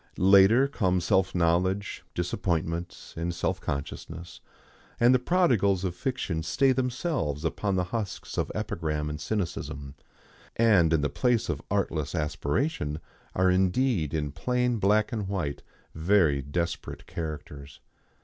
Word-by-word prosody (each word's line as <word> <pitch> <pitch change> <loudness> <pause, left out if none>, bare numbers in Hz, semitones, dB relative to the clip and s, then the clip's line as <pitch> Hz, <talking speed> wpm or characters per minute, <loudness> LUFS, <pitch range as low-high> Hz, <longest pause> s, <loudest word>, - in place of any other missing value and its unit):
Later 100 +7 +6
come 95 -10 +1
self 95 +1 +1
knowledge, 90 +4 +1
disappointments 85 -1 -2
and 85 +1 -2
self - - -1
consciousness, 80 +4 -6 0.6
and 120 +2 +6
the 130 - +4
prodigals 120 - +2
of 90 -3 -1
fiction 90 -5 -2
stay 130 - +2
themselves 125 - -1
upon 100 +4 -1
the 90 - +1
husks 100 +2 -5
of - - -1
epigram 80 -8 -2
and 75 0 -6
cynicism, 85 -8 -3 0.6
and 100 -8 +4
in 80 -2 +3
the 75 - +1
place 120 - +1
of - - -2
artless 85 -7 -1
aspiration 75 - -1 0.4
are 95 0 +3
indeed 95 - +1
in 75 -3 -2
plain 125 - 0
black 105 +2 +3
and 105 -4 -3
white 85 -8 -3 0.3
very 80 -4 +3
desperate 85 +5 -4
characters. 75 -3 -7
90 Hz, 130 wpm, -27 LUFS, 80-110 Hz, 0.6 s, Later